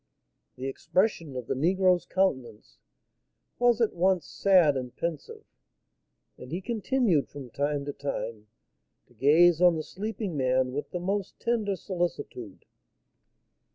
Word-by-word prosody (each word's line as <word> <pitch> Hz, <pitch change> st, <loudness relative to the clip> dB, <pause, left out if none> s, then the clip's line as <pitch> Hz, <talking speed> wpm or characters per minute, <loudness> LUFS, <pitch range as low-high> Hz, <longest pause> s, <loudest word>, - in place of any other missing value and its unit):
The 130 Hz, -, -7 dB
expression 165 Hz, +2 st, -1 dB
of 125 Hz, -2 st, -4 dB
the -, -, -1 dB
negro's 180 Hz, +5 st, +2 dB
countenance 130 Hz, -, -2 dB, 0.8 s
was 245 Hz, -1 st, +4 dB
at 225 Hz, -, +2 dB
once 180 Hz, -2 st, +1 dB
sad 180 Hz, -4 st, +4 dB
and 125 Hz, -2 st, -5 dB
pensive, 165 Hz, -3 st, -5 dB, 1.0 s
and 125 Hz, -, -10 dB
he 175 Hz, -, -2 dB
continued 220 Hz, -, 0 dB
from 135 Hz, -4 st, -10 dB
time 145 Hz, +1 st, -1 dB
to 145 Hz, -, -4 dB
time 110 Hz, -6 st, -5 dB, 0.6 s
to -, -, -25 dB
gaze 160 Hz, +7 st, +4 dB
on 175 Hz, -2 st, +6 dB
the 155 Hz, -, -3 dB
sleeping 210 Hz, -1 st, -5 dB
man 130 Hz, -1 st, +1 dB
with 145 Hz, +3 st, -4 dB
the 180 Hz, -, -4 dB
most 195 Hz, +2 st, -3 dB
tender 220 Hz, -4 st, 0 dB
solicitude. 170 Hz, -, -5 dB
165 Hz, 130 wpm, -28 LUFS, 135-190 Hz, 1.0 s, on